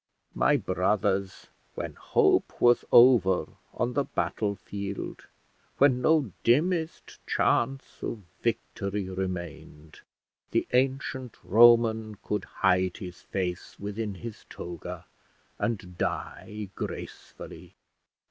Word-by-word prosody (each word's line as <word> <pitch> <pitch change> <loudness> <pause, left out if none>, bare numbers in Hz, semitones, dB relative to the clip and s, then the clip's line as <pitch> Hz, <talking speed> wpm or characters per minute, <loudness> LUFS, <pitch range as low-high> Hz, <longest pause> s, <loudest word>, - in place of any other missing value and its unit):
My - - +3
brothers, 95 +1 0 0.3
when - - -4
hope - - +2
was 120 0 +5
over 120 -7 +6 0.2
on 120 +1 -2
the 140 - +1
battle 105 -5 -2
field, 100 0 -6 0.5
when 130 -3 +4
no 150 -5 +3
dimmest 160 +6 +1
chance 135 +3 0
of 110 -3 -4 0.2
victory 100 0 -2
remained, 85 -5 -6 0.5
the - - 0
ancient 130 -1 0
Roman 110 0 +5
could 105 +1 -3
hide 90 0 +1
his 90 -5 -9
face 90 -1 -4
within 105 0 -4
his 115 +2 -8
toga, 85 0 -7 0.5
and 95 -6 -3
die 105 -1 -4
gracefully. - - -8
105 Hz, 100 wpm, -28 LUFS, 95-120 Hz, 0.5 s, over